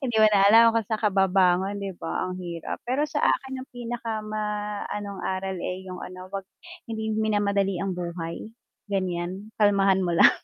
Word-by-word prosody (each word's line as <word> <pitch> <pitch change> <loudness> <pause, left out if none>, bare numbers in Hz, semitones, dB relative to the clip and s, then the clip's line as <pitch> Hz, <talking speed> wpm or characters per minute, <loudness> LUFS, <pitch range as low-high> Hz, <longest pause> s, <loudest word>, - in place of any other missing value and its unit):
Hindi 240 -4 -1
mo 220 - +7
na 200 - +5
alam 225 +2 +8
kung - - +4
san 220 - +1
ka 210 - +3
babangon, 190 0 +3
'di 195 -1 -4
ba, 165 - -2
ang 185 - -5
hirap. 170 -2 -5
Pero 275 +4 +2
sa 295 - -1
akin, 265 -1 0
yung - - -14
pinaka 235 -2 -4
ma 215 0 -3 0.5
anong 200 -1 -5
aral 190 0 -2
eh 185 +1 -4
yung 180 -1 -7
ano 185 0 -8
'wag 195 -1 -4 0.5
hindi 220 0 -2
minamadali 200 -3 +1
ang 195 -1 -1
buhay, 170 -1 -4 0.5
gan'yan. 185 +2 -2
Kalmahan 195 -2 +4
mo 170 -1 0
lang. - - +8
195 Hz, 185 wpm, -26 LUFS, 185-220 Hz, 0.5 s, alam